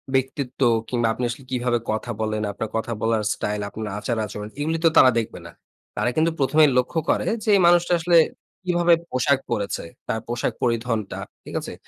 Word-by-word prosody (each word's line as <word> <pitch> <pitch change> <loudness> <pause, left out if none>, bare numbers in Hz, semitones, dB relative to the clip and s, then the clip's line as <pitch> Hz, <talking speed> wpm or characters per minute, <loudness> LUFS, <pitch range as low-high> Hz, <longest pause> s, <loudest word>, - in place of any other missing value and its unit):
ব্যক্তিত্ব, 130 0 -2 0.3
কিংবা 120 -2 +1
আপনি 125 - -5
আসলে 125 +3 -6
কিভাবে 125 -1 +1
কথা 110 +2 -3
বলেন, 110 0 -1
আপনার 110 +2 -5
কথা 110 +1 -2
বলার 110 -1 +1
স্টাইল, 105 0 -3
আপনার 110 +1 -6
আচার 115 +2 -2
আচরণ। 105 0 -7
এগুলি 160 +3 0
তো 165 - +8
তারা 130 - +8
দেখবে 110 - -5
না। - - -9 0.5
তারা - - +1
কিন্তু 160 +1 +2
১ম 135 +2 0
এই - - +4
লক্ষ্য 125 +6 +1
করে - - +2 0.2
যে 220 - -2
এই - - +4
মানুষটা 175 0 +4
আসলে 170 +1 +4 0.5
কিভাবে 175 -1 +3 0.2
পোশাক 130 +2 +2
পড়েছে, 100 -1 -2 0.2
তার 110 - -1
পোশাক 120 0 -1
পরিধনটা। 115 -3 -1 0.2
ঠিক - - -10
আছে? - - -7
125 Hz, 185 wpm, -23 LUFS, 110-145 Hz, 0.5 s, তো